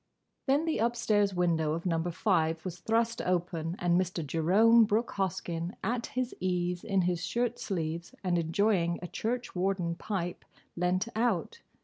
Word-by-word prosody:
Then 280 +4 +3
the 320 - 0
upstairs 215 -4 +2
window 165 -3 +1
of 165 +2 -4
Number 165 -1 0
Five 165 -3 +1
was 180 -1 -5
thrust 230 +4 0
open 175 -2 -1
and 175 +1 +3
Mr. 175 -3 -3
Jerome 200 +10 +5
Brooke 220 +2 +1
Hoskyn, 175 -2 -2
at 235 0 -1
his 255 -1 -2
ease 180 -1 -1
in 195 -3 +1
his 175 -1 0
shirt 240 0 -1
sleeves, 170 -3 -3
and 175 -2 +1
enjoying 170 0 +1
a - - -3
church 240 +5 -3
warden 180 -2 0
pipe, 175 -1 -4 0.3
leant 180 +4 +1
out. 220 -7 0
180 Hz, 150 wpm, -30 LUFS, 170-220 Hz, 0.3 s, Jerome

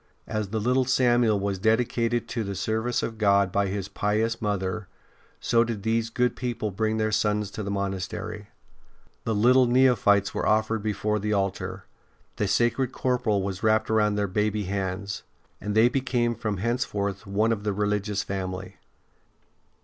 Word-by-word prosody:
As 110 -3 -3
the 110 +2 -2
little 125 +4 +2
Samuel 120 -4 +3
was 100 -1 -2
dedicated 115 +2 +1
to 115 -2 -2
the 100 -1 -4
service 110 +5 -1
of 115 -1 -4
God 100 -2 +3
by 100 +1 +1
his 100 0 -3
pious 110 +2 -1
mother, 100 -2 -2 0.5
so 115 0 +3
did 115 -4 -4
these 115 +1 0
good 125 +1 0
people 120 -4 -3
bring 110 +3 -1
their 110 0 0
sons 105 -1 0
to 110 - -5
the 100 - -4
monastery. 100 +1 -4 0.8
The 110 - 0
little 125 +4 +5
neo 130 +1 +5
phytes 100 -2 +2
were - - -1
offered 110 0 +2
before 105 0 -1
the 105 +1 -1
altar; 100 -2 -2 0.5
the 105 - 0
sacred 120 +5 +1
corporal 125 -7 0
was 95 -1 -4
wrapped 110 0 +2
round 105 -1 +2
their 105 - +1
baby 105 +2 0
hands, 95 0 -3 0.4
and 105 0 -3
they 110 +2 +6
became 125 -2 0
from 105 -3 -3
henceforth 100 -3 -2
one 105 +3 +1
of 105 -2 -2
the 105 - 0
religious 105 0 -1
family. 95 -1 -5
105 Hz, 165 wpm, -26 LUFS, 100-115 Hz, 0.8 s, they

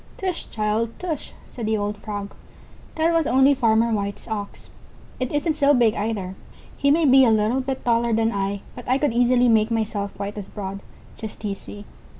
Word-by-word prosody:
"Tush, 370 -3 -3
child, 220 +1 -1
tush," 330 -6 -4
said 230 -3 -6
the 220 0 +1
old 205 0 -2
Frog, 205 -1 -6 0.6
"that 325 +1 +2
was 330 -3 +2
only 265 +2 +5
Farmer 230 -2 +2
White's 200 -1 -3
Ox. 210 -3 -6 0.5
It 255 -1 -2
isn't 300 +2 0
so 285 -1 +4
big 235 -3 +4
either; 205 -3 -3 0.4
he 280 - +1
may 315 +3 +4
be 265 -1 +7
a 245 - +5
little 220 +4 +2
bit 265 0 -4
taller 235 0 +2
than 225 0 +2
I, 200 -1 -2
but 245 - -9
I 255 - +4
could 280 -4 0
easily 245 +1 +4
make 220 -1 +4
myself 215 -3 -2
quite 200 +1 -4
as 200 - -8
broad; 195 -1 -6 0.4
just 220 0 -8
you 200 - -1
see." 205 +1 -10
225 Hz, 190 wpm, -23 LUFS, 205-260 Hz, 0.6 s, be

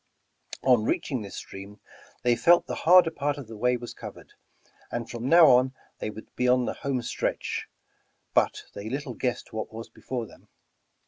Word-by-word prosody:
On 125 -4 +4
reaching 125 +2 -1
this 100 - -8
stream 100 +2 -9 0.4
they 120 -1 +4
felt 170 +8 +5
the - - -5 0.2
harder 180 -2 +8
part 145 -1 -1
of 140 - -7
the 110 0 -10
way 125 +3 +1
was 120 0 -8
covered, - - -11 0.6
and 120 -1 -3
from 120 +2 -4
now 170 0 +8
on 130 +1 +4 0.2
they - - -3
would 110 +1 -11
be 125 - +1
on 125 0 +4
the - - -2
home 135 -4 -2
str - - -1
etch, - - -3 0.7
but - - +2
they 100 +2 -6
little 135 0 -4
guessed 125 +1 -3
what 110 0 -4
was 115 +1 -8
before 125 -3 -5
them. - - -17
125 Hz, 185 wpm, -27 LUFS, 115-135 Hz, 0.7 s, harder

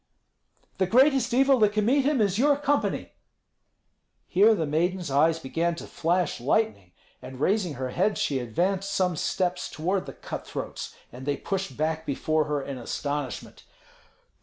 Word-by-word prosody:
"The 190 - +2
greatest 260 +3 +4
evil 270 +1 +4
that 210 -1 +4
can 210 -1 +1
meet 270 +3 +3
him 285 -4 +2
is 200 0 +1
your 285 +2 +4
company." 290 0 -1 1.2
Here 210 +5 +5
the 165 - -1
maiden's 170 +2 -1
eyes 160 +4 +3
began 165 +3 -1
to - - -8
flash 175 0 0
lightning, 120 - 0 0.3
and 130 0 -9
raising 185 -1 +1
her 130 0 -3
head 195 +9 +1
she 135 -2 0
advanced 180 - -1
some 180 -3 +1
steps 180 +3 -1
toward 185 +5 -2
the - - -7
cutthroats, - - -6 0.2
and 130 +3 -10
they 145 - 0
pushed 195 -9 -4
back 160 +1 -1
before 155 +2 0
her 145 -2 -2
in 135 -2 -6
astonishment. 140 +2 -4
175 Hz, 155 wpm, -26 LUFS, 145-210 Hz, 1.2 s, Here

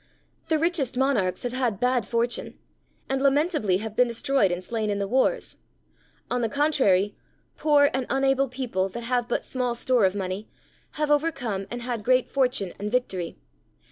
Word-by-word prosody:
The 320 - +2
richest 310 -6 0
monarchs 215 -9 +1
have 245 0 -3
had 245 -6 0
bad 250 -4 +1
fortune, 235 +1 -2 0.5
and 270 0 -1
lamentably 280 - +2
have 220 -1 -6
been 250 +1 +4
destroyed 235 -3 +1
and 175 +1 -3
slain 220 +1 -2
in 205 - 0
the 200 0 -2
wars; 265 - 0 0.7
on 245 0 -1
the 230 - 0
contrary, 235 -9 +2 0.4
poor 290 -2 +4
and 260 -1 -1
unable 270 0 +2
people, 235 -7 -2
that 235 +5 -6
have 245 0 0
had - - -27
but 240 - -2
small 250 -2 -2
store 240 -2 +2
of 190 +1 +1
money, 190 +1 -4 0.4
have 300 0 -1
overcome 260 -11 0
and 240 0 -5
had 240 -3 -3
great 255 +2 +3
fortune 250 -9 +1
and 210 +1 -3
victory. 190 -9 -1
245 Hz, 170 wpm, -25 LUFS, 210-270 Hz, 0.7 s, been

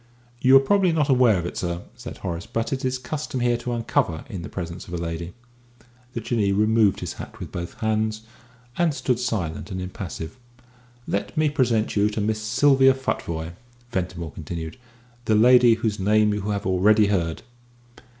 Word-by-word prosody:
"You 130 +1 +7
are - - +5
probably 190 +5 +3
not 155 -3 +1
aware 125 -6 +5
of 85 - -3
it, - - -5
sir," 85 -1 -3
said 120 0 -9
Horace, 90 0 -5
"but 115 +3 -2
it 130 - -3
is 130 0 0
the 125 -1 -14
custom 150 -3 -3
here 120 0 +2
to 120 +1 -5
uncover 115 -8 -1
in 95 -4 -5
the - - -7
presence 85 -1 -6
of 90 - -5
a - - -2
lady." 85 +1 -5 0.8
The 115 - -3
Jinnee 110 -3 0
removed 110 0 +3
his - - -4
hat - - -10
with - - -7
both 85 0 -6
hands, 110 0 0 0.6
and 165 -4 +2
stood 125 -4 0
silent 100 -9 -2
and 95 -2 -4
impassive. 90 0 -6 0.7
"Let 100 - -3
me 155 -1 +3
present 120 -6 +1
you 105 0 +3
to 105 - -4
Miss 110 +1 -1
Sylvia 135 +4 +4
Futvoye," 85 -10 -3 0.4
Ventimore 90 -4 -3
continued, 80 +1 -6 0.5
"the 110 - +3
lady 120 +1 +6
whose 110 -2 -2
name 105 +2 +3
you 105 - -2
have 100 0 -2
already 105 +3 +4
heard." 85 -5 -1
110 Hz, 180 wpm, -24 LUFS, 90-125 Hz, 0.8 s, You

